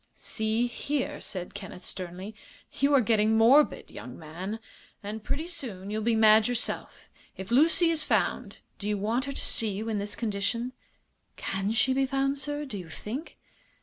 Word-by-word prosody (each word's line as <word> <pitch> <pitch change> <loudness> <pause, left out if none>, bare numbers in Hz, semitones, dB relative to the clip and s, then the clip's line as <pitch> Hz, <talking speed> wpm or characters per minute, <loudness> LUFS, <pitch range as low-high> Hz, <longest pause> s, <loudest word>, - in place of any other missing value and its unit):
"See 220 +2 0
here," 270 +3 -2
said 180 -2 -4
Kenneth, 200 -2 -8
sternly, 185 +3 -5 0.4
"you 285 0 +1
are 270 - +6
getting 220 0 +3
morbid, 260 +7 +5
young 125 +3 -9
man, 180 +7 -6 0.4
and 210 +1 -5
pretty 285 +7 -2
soon 210 - -5
you'll 215 +1 -1
be 230 +1 +2
mad 220 0 +6
yourself. 245 -1 -3 0.3
If 190 +3 -7
Lucy 325 +6 +5
is 315 -2 +1
found - - 0 0.2
do 205 - -3
you 210 - +1
want 225 +6 0
her 280 - -3
to - - 0
see 225 - +2
you 210 +3 -3
in 215 -2 0
this 205 +1 -2
condition?" 230 +3 -1 0.6
"Can 195 +2 -2
she 225 +3 +3
be 270 0 +2
found, 275 +1 0
sir, 290 +1 -3
do 210 -8 -5
you 175 -3 -9
think?" 245 - -6
220 Hz, 175 wpm, -28 LUFS, 200-270 Hz, 0.6 s, are